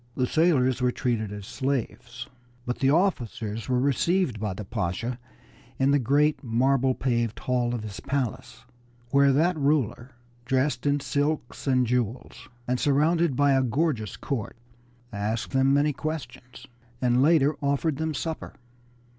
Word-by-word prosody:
The 130 - +1
sailors 130 -5 +2
were 125 0 +2
treated 115 -5 -2
as 105 -1 -7
slaves, 125 -1 -3 0.4
but 125 - -3
the 135 - +3
officers 120 - -1
were 125 -1 +2
received 140 - +1
by 105 -3 -3
the 105 - -7
Pasha 110 +4 -3 0.6
in 135 +1 +2
the 145 - +4
great 145 +5 +2
marble 130 +2 +2
paved 120 -3 -1
hall 120 -1 -1
of 115 - -5
his 100 -3 -7
palace, 130 -1 -4 0.5
where 140 0 +5
that 165 +6 +2
ruler, 135 -4 0 0.3
dressed 130 +4 0
in 145 0 +1
silks 145 -2 -2
and 130 -1 +3
jewels, 120 0 -3 0.2
and 125 0 0
surrounded 155 +2 +2
by 145 +2 +3
a 135 -1 +4
gorgeous 125 -3 -1
court, 120 -6 -4 0.6
asked 105 +3 -2
them 135 +1 +3
many 145 +1 +3
questions, 155 -5 -6 0.3
and 125 0 +2
later 150 -1 +4
offered 140 +1 0
them 160 0 -2
supper. 160 +2 -5
130 Hz, 145 wpm, -26 LUFS, 120-145 Hz, 0.6 s, where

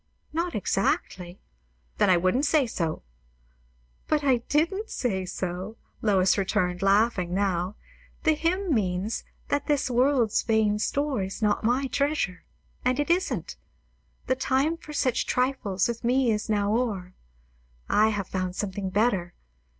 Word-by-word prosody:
"Not 335 +2 -1
exactly." 180 0 -1 0.6
"Then - - +4
I 180 - +6
wouldn't 185 - +2
say 300 -3 +3
so." 165 -9 -3 1.0
"But 300 -1 +1
I 265 -3 +4
didn't 380 +9 +1
say 190 -7 -2
so," 185 +4 -4 0.2
Lois 195 -2 +3
returned, 180 -2 0
laughing 195 -3 +2
now. 190 -1 0 0.5
"The 315 - +4
hymn 340 +3 0
means, 195 -1 -1 0.3
that 285 0 0
'this 285 -3 +1
world's 245 -2 +3
vain 220 -2 +2
store' 280 +1 0
is 190 +4 -5
not 210 +1 +1
my 245 +5 +2
treasure; 275 -9 -1 0.4
and 255 +2 +1
it 290 +3 +1
isn't. 365 +2 -1 0.7
'The 260 - +1
time 270 +5 +1
for 320 -2 -12
such 260 -4 0
trifles 250 -7 0
with 235 0 -4
me 250 +1 +2
now - - +4
is 215 +1 -3
o'er.' 205 -3 0 0.7
I 215 +1 +4
have 205 -3 -2
found 185 -1 -3
something 195 -1 -3
better. 195 -4 0
220 Hz, 140 wpm, -26 LUFS, 190-275 Hz, 1.0 s, I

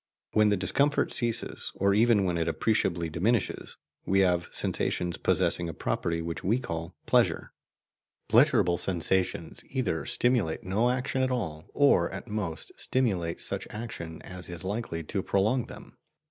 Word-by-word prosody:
When 105 -1 +5
the 105 - +2
discomfort 140 +10 +1
ceases, 120 -2 -2
or 100 0 +2
even 110 -1 +4
when 90 -2 0
it 85 -1 0
appreciably 85 -2 +1
diminishes, 95 +8 -1 0.3
we 95 +1 +3
have 90 -2 +2
sensations 90 -1 -1
possessing 85 -1 +1
a 80 - -7
property 85 -1 -1
which 85 0 -5
we 110 +7 +2
call 85 -7 -5
PLEASURE. - - +2 0.7
Pleasurable 115 - +4
sensations 90 -2 -1
either 115 -12 -1
stimulate 120 -10 +1
no 105 +6 +1
action 130 +1 -1
at 130 - +2
all, 85 -12 -3
or 140 -12 +4
at 95 +5 -7
most 105 -7 -4
stimulate 95 -10 0
such - - -1
action 85 -8 -7
as 90 0 -7
is 85 +1 -3
likely 95 -4 -3
to 95 +5 -2
prolong 110 +7 +1
them. - - -12
95 Hz, 145 wpm, -28 LUFS, 85-115 Hz, 0.7 s, When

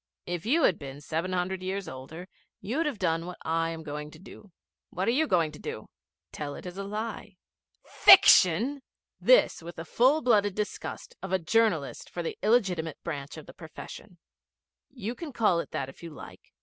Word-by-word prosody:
If 175 +2 -4
you 315 +7 +3
had 180 - +3
been 140 0 -8
seven 160 +5 -3
hundred 185 +1 -2
years 190 +1 -3
older 145 +8 -9 0.3
you'd 290 +10 -1
have 280 -7 -3
done 165 -2 -1
what 180 - -7
I 165 0 0
am 165 -1 -6
going 150 0 -6
to - - -14
do.' 190 +1 -14 0.4
'What 185 +2 -3
are - - +4
you 310 +6 +2
going 170 -6 +2
to 150 - -12
do?' - - -7 0.4
'Tell 145 -1 -5
it - - -10
as 180 +2 -7
a - - -3
lie.' 210 -1 -6 0.5
'Fiction?' 265 - +6 0.4
This - - +4
with 170 +1 -9
the 165 - -7
full 265 - +3
blooded 205 -5 +3
disgust 210 -1 -5
of 190 - -6
a 190 - +3
journalist 185 -4 0
for 175 - -5
the - - -4
illegitimate 185 - +1
branch 140 +2 -5
of 155 - -10
the - - -13
profession. 175 +3 -11 0.7
'You 240 -4 -5
can 310 +3 -8
call 210 -8 +2
it - - -5
that 135 - -3
if 135 - -13
you 170 - -7
like. 150 - -13
185 Hz, 190 wpm, -28 LUFS, 160-220 Hz, 0.7 s, Fiction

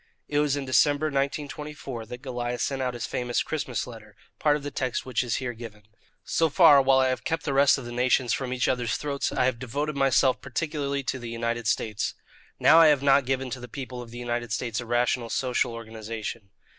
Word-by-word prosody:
It 145 - 0
was 150 -2 +2
in 140 -1 -3
December, 145 +3 +3
1924, 140 -3 -4
that 125 +3 -9
Goliah 120 -2 -3
sent 135 -1 -1
out 125 -1 -1
his 120 - -4
famous 120 -1 -1
"Christmas 140 -6 -3
Letter," 110 -4 -12 0.2
part 150 -1 +3
of 150 - -5
the 145 - -5
text 130 -3 -2
of - - -25
which 130 -4 0
is 120 -3 -1
here 125 -2 -3
given: 110 -2 -10 0.4
"So 165 -1 +1
far, 145 -1 +7
while 135 0 +4
I 130 0 +3
have 130 - -2
kept 165 0 -2
the 140 - -2
rest 140 +1 +5
of 135 - -7
the 120 - -7
nations 125 -1 +2
from 130 +1 -3
each 125 -1 0
other's 120 -3 0
throats, 140 -2 -2
I - - +1
have 125 -2 0
devoted 145 +5 -3
myself 135 -1 +3
particularly 140 0 -2
to 130 0 -3
the 120 -1 -7
United 115 0 -2
States. 110 -2 -1 0.4
Now 165 - +7
I 165 - +8
have 145 -3 +3
not 140 -2 +4
given 135 -1 -1
to 130 - -4
the 125 - -8
people 125 0 -7
of 120 - -10
the 120 - -10
United 120 -1 -3
States 115 -1 -2
a 120 - -6
rational 120 0 +1
social 125 0 0
organization. 110 -2 -7
130 Hz, 220 wpm, -26 LUFS, 120-140 Hz, 0.4 s, I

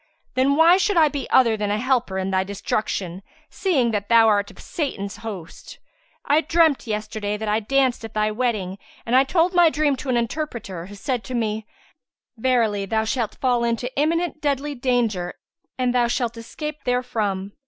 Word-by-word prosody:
Then 265 +2 +2
why 330 +4 +6
should 385 0 +1
I 315 -2 +6
be 280 -2 -5
other 235 -4 +5
than 210 -1 -2
a 205 - +1
helper 245 -5 0
in 190 0 -2
thy 190 0 +2
destruction, 195 -2 -3 0.3
seeing 275 - +1
that 205 -2 -3
thou 230 -1 +6
art 205 -2 +2
of - - -16
Satan's 200 - -4
host? 195 -7 -8 0.5
I 300 +2 +4
dreamt 325 -6 +2
yesterday 210 -1 -3
that 220 +1 -5
I 210 +1 +2
danced 260 +2 +1
at 225 -1 -8
thy 215 0 +1
wedding 210 -5 -2 0.3
and 235 - +1
I 260 - +7
told 335 +6 +1
my 350 -2 +6
dream 295 -1 +1
to 265 - -6
an 245 - +2
interpreter 230 - -4
who 205 - -10
said 245 +3 -3
to 255 - -5
me, 220 -2 -2 0.7
'Verily 225 -5 +1
thou 220 +2 +1
shalt 225 -1 -2
fall 245 -2 +1
into 235 +2 -2
imminent 320 +2 0
deadly 290 0 -1
danger 240 -9 0 0.4
and 250 -1 +1
thou 245 -1 +3
shalt 235 -1 -1
escape 300 +6 -7
therefrom.' 215 -6 -1
235 Hz, 180 wpm, -23 LUFS, 210-275 Hz, 0.7 s, I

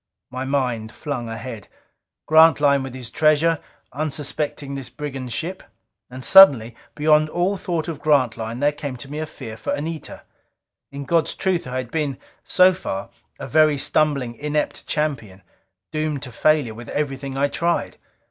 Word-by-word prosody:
My 130 +1 -4
mind 125 -5 -1
flung 125 -6 -5
ahead. 115 -2 -7 0.6
Grantline 155 -3 +5
with 130 -1 -7
his 125 -3 -7
treasure, 155 +1 +3 0.3
unsuspecting 145 -1 -3
this 135 -3 -6
brigand 135 -1 -6
ship. 175 +8 -3 0.5
And 130 +1 -6
suddenly, 130 - +7 0.2
beyond 155 0 +3
all 180 +5 0
thought 175 -4 -3
of 155 -4 -5
Grantline, 120 -5 +1
there 145 +1 +3
came 145 -3 -6
to 135 +3 -9
me 150 - -4
a 155 - -3
fear 120 -7 -9
for - - -3
Anita. 160 +2 -6 0.7
In 140 0 -7
God's 165 +3 +1
truth 185 -6 -1
I 125 +1 -4
had 125 -2 -5
been, 150 -5 -2 0.3
so 185 0 +5
far, 115 - -5 0.3
a - - -6
very 155 -1 +4
stumbling, 140 -3 +1
inept 150 +4 -3
champion, 115 - -3 0.5
doomed 155 -2 -2
to 130 - -6
failure 150 -4 +2
with 115 +2 -10
everything 135 -2 -3
I 140 +1 +2
tried. 170 +4 -1
145 Hz, 155 wpm, -22 LUFS, 125-155 Hz, 0.7 s, suddenly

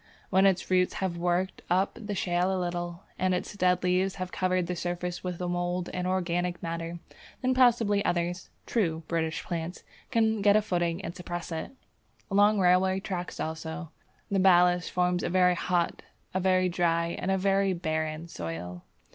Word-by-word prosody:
When 190 0 +5
its 190 -1 0
roots 180 0 +3
have 190 -3 -2
worked 175 +2 -1
up 185 +3 +2
the 210 -3 -5
shale 180 0 +1
a 190 - 0
little, 175 0 -3 0.2
and 185 0 +2
its 180 - -4
dead 180 -2 +2
leaves 185 +1 +1
have 185 -1 -5
covered 185 -1 +1
the 180 +1 -3
surface 175 0 -3
with 180 -2 -4
mould 175 0 -2
and 180 0 -2
organic 175 -1 -1
matter, 165 0 -4 0.5
then 255 0 +3
possibly 230 -5 +4
others 175 0 -1 0.2
(true 165 -8 0
British 165 0 -1
plants) 170 +1 -4 0.3
can 220 -3 +2
get 205 0 +5
a 215 - +5
footing 175 -2 -1
and 170 - -5
suppress 175 -1 -6
it. 160 +8 -4 0.6
Along 205 +2 +5
railway 185 +1 +4
tracks, 185 -3 -5
also, 160 +1 -5 0.4
the 195 - +2
ballast 180 -2 +5
forms 180 0 +1
a - - -1
very 180 0 +4
hot, 175 -1 0 0.3
a 185 - +1
very 185 0 +3
dry, 170 -1 +1
and - - -2
a 190 - +2
very 195 0 +2
barren 160 -2 -2
soil. 90 - -6
180 Hz, 170 wpm, -28 LUFS, 170-190 Hz, 0.6 s, When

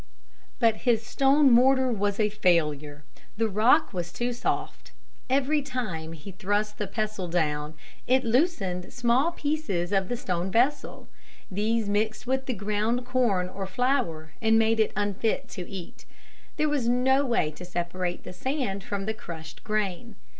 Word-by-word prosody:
But 225 -2 +3
his 230 -2 +1
stone 275 +2 +4
mortar 260 +1 +5
was 205 -2 -1
a 215 - +4
failure. 150 -7 +1 0.3
The 225 0 +2
rock 220 +9 +3
was 175 -1 -4
too 240 +5 -2
soft. 240 - -3 0.4
Every 280 +3 +2
time 215 - -4
he 165 +5 -9
thrust 205 +2 -1
the 210 - -2
pestle 215 -2 -3
down, 155 -3 -1 0.3
it 260 +1 +3
loosened 225 - 0
small 245 +7 +2
pieces 285 - -2
of 195 -2 +1
the 245 - -1
stone 180 -5 -2
vessel. 250 +8 0 0.4
These 215 +3 0
mixed 215 +3 0
with 265 +1 -1
the 255 - -1
ground 215 +4 -1
corn 240 -8 +1
or 190 +1 -5
flour 190 - -1
and 225 0 +4
made 225 0 +3
it 220 - +3
unfit 205 +2 -1
to 180 -3 -7
eat. 195 +5 -9 0.5
There 305 - +2
was 280 -6 0
no 265 +3 +3
way 235 - +1
to 165 - -11
separate 175 0 -3
the - - -8
sand 245 -3 -2
from 200 -1 -3
the 220 - -1
crushed 160 -7 -9
grain. 215 0 -2
215 Hz, 155 wpm, -27 LUFS, 185-250 Hz, 0.5 s, mortar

